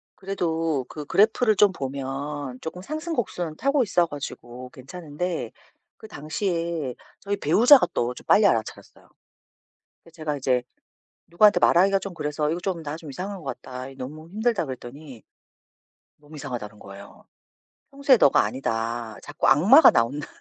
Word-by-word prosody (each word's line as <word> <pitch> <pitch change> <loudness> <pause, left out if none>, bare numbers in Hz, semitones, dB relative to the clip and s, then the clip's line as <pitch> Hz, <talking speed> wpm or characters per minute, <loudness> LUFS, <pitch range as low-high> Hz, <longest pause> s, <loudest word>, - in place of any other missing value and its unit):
그래도 165 -7 -2
그 150 -2 -8
그래프를 215 - +3
좀 205 0 +5
보면 135 -1 -5
쪼끔 180 +3 -7
상승곡선은 240 - -4
타고 275 -1 +2
있어 175 -4 +2
가지고 130 -4 -8
괜찮은데 165 +5 -5 0.5
그 220 - -12
당시에 165 -4 -3 0.3
저희 200 0 -2
배우자가 220 - +5
또 120 +1 -1
좀 - - -14
빨리 210 - +5
알아차렸어요. 115 - -2 0.9
근데 165 - -19
제가 155 -3 -4
이제 130 -2 0 0.6
누구한테 205 +5 +4
말하기가 195 +3 +4
좀 190 -1 -7
그래서 150 -1 -2
"이거 170 +2 -2
좀 180 -3 -3
나 150 +1 -5
좀 160 -3 -11
이상한 190 +7 -6
것 170 - -12 0.2
같다. 130 0 -8
이게 135 - -12
너무 155 +5 -9
힘들다." 220 -2 -1
그랬더니 130 0 -10 0.9
몸이 150 +1 -15
이상하다는 120 -7 -7
거예요. 100 +1 -13 0.7
"평소의 275 -2 +4
너가 140 - +5
아니다. 115 -1 -3
자꾸 - - -2
악마가 190 - +7
나온다." 125 +6 0
155 Hz, 340 characters per minute, -24 LUFS, 130-195 Hz, 0.9 s, 악마가